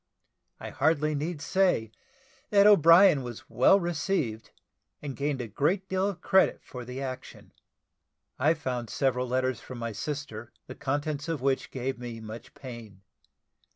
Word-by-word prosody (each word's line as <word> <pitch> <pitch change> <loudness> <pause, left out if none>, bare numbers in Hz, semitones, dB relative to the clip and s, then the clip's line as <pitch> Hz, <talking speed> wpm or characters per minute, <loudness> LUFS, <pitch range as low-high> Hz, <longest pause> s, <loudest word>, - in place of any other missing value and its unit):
I - - -7
hardly 155 -1 +1
need 150 +1 -3
say 180 - +1 0.6
that 200 -1 +5
O'Brien 170 -4 +7
was 120 -3 -8
well 130 +10 +5
received, 145 - -2 0.5
and 140 -3 -6
gained 140 -2 -2
a 120 - -5
great 180 - 0
deal 190 +1 0
of 180 -3 -7
credit 190 - +3
for 125 -1 -8
the 125 +2 -7
action. 130 -1 -7 0.9
I 155 +5 +3
found 125 -6 -4
several 130 0 0
letters 130 0 -1
from 130 - -9
my 115 -1 -4
sister, 120 -1 -6
the 130 - -8
contents 145 +3 -3
of 165 -3 -1
which 135 +1 0
gave 130 -1 -4
me 120 -2 -7
much 110 +2 -10
pain. 115 -7 -10
135 Hz, 150 wpm, -28 LUFS, 120-160 Hz, 0.9 s, O'Brien